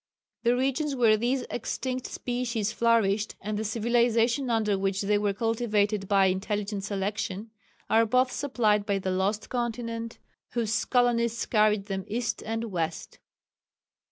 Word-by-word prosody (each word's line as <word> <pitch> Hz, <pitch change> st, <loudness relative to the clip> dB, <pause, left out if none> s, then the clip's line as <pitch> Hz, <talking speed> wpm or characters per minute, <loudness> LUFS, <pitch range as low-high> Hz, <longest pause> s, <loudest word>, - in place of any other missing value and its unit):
The 240 Hz, +1 st, +3 dB
regions 275 Hz, +3 st, 0 dB
where 230 Hz, -4 st, +5 dB
these 245 Hz, +4 st, 0 dB
extinct 255 Hz, +2 st, -3 dB
species 235 Hz, -4 st, -2 dB
flourished, 220 Hz, -3 st, +2 dB
and 210 Hz, +2 st, -4 dB
the 215 Hz, -, -2 dB
civilization 235 Hz, +3 st, +2 dB
under 220 Hz, -3 st, +2 dB
which 195 Hz, 0 st, -1 dB
they 205 Hz, +1 st, +2 dB
were 205 Hz, -1 st, +1 dB
cultivated 210 Hz, -2 st, 0 dB
by 195 Hz, -1 st, +4 dB
intelligent 200 Hz, +2 st, -1 dB
selection, 200 Hz, +1 st, -3 dB, 0.4 s
are 225 Hz, 0 st, +4 dB
both 255 Hz, +3 st, +3 dB
supplied 225 Hz, -7 st, +1 dB
by 200 Hz, -1 st, +1 dB
the 190 Hz, -1 st, -2 dB
lost 200 Hz, +4 st, -1 dB
continent 230 Hz, -1 st, -3 dB, 0.4 s
whose 225 Hz, -2 st, 0 dB
colonists 235 Hz, -2 st, +2 dB
carried 210 Hz, -2 st, +2 dB
them 195 Hz, -2 st, -4 dB
east 235 Hz, +2 st, -2 dB
and 225 Hz, 0 st, -3 dB
west. 165 Hz, -2 st, -3 dB
220 Hz, 135 wpm, -27 LUFS, 205-240 Hz, 0.4 s, where